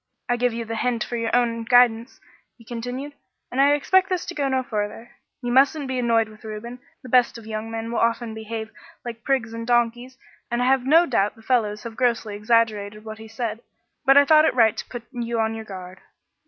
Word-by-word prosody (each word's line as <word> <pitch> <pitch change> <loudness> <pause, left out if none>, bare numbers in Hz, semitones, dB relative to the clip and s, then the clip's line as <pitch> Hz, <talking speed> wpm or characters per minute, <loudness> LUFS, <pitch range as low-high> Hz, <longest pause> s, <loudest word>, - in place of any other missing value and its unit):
I 245 - +1
give 245 0 +1
you 230 0 -4
the 225 0 -4
hint 240 -3 0
for 240 - -5
your 230 -1 -1
own 230 -2 +1
guidance,' 240 0 +3 0.4
he 230 - -18
continued, 250 +5 -5 0.4
'and 265 - +1
I 285 +1 +5
expect 375 +6 +3
this 365 -2 -1
to 350 - -6
go 285 -4 -1
no 260 -1 0
farther. 220 -1 -4 0.3
You 245 - -2
mustn't 275 +3 +3
be 260 -1 -2
annoyed 230 -2 +2
with 215 0 -16
Reuben. 220 +3 -7 0.2
The 255 - -10
best 245 -1 +3
of 230 - -12
young 220 0 -5
men 225 0 -5
will 235 - -1
often 230 0 0
behave 220 0 -6 0.3
like 235 -1 -7
prigs 250 -5 0
and 230 0 -6
donkeys, 240 +1 0 0.3
and 240 0 -1
I 245 - +1
have 260 0 +2
no 325 +4 +6
doubt 210 - 0
the 225 - -18
fellows 215 -4 0
have 230 -1 -7
grossly 235 -4 0
exaggerated 215 -1 0
what 220 0 -8
he 220 - -10
said; 225 0 -4 0.4
but 270 +1 +6
I 285 - +8
thought 310 +1 +6
it - - +1
right 225 -3 +4
to - - -5
put 240 -2 -7
you 235 -2 -3
on 220 0 +1
your 225 0 -7
guard.' 185 -2 -9
235 Hz, 220 wpm, -23 LUFS, 220-250 Hz, 0.4 s, I